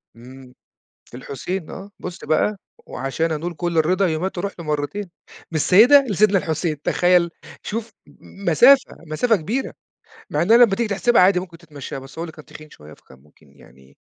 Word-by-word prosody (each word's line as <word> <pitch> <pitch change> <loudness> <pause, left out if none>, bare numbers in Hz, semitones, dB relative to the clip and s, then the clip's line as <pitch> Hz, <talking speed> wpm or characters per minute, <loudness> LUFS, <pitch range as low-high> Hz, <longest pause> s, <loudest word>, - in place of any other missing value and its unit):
إمم، 125 +2 -14 0.5
في 120 - -12
الحسين 155 +7 -6
آه، 195 +1 -9
بُص 180 -1 -8
بَقى 195 +7 0 0.3
وعشان 160 +5 -3
أنول 170 +3 -4
كل 170 0 -3
الرضا 185 +5 +2
يوماتي 175 +3 -3
أروح 200 +2 -4
له 170 - -8
مرتين 150 +7 -3 0.4
من - - -7
السيدة 225 - +6
لسيدنا 205 0 +3
الحسين 160 -3 -3
تخيل؟ 180 -1 +2 0.3
شوف 225 +1 -5 0.3
مسافة، 220 - +3
مسافة 220 +10 +1
كبيرة 215 +10 -3 0.6
مع - - -1
إنها 220 +7 +5
لما 235 -5 +5
تيجي 235 +2 -1
تحسبها 230 +3 +2
عادي 180 0 +4
ممكن 175 -2 -10
تتمشاها 150 -5 -9
بس 135 +4 -14
هو - - -3
اللي 165 - -7
كان 155 -1 -15
تخين 155 0 -13
شوية 75 - -15
فكان 65 - -19
ممكن 70 0 -25
يعني 65 0 -21
170 Hz, 170 wpm, -21 LUFS, 150-200 Hz, 0.6 s, السيدة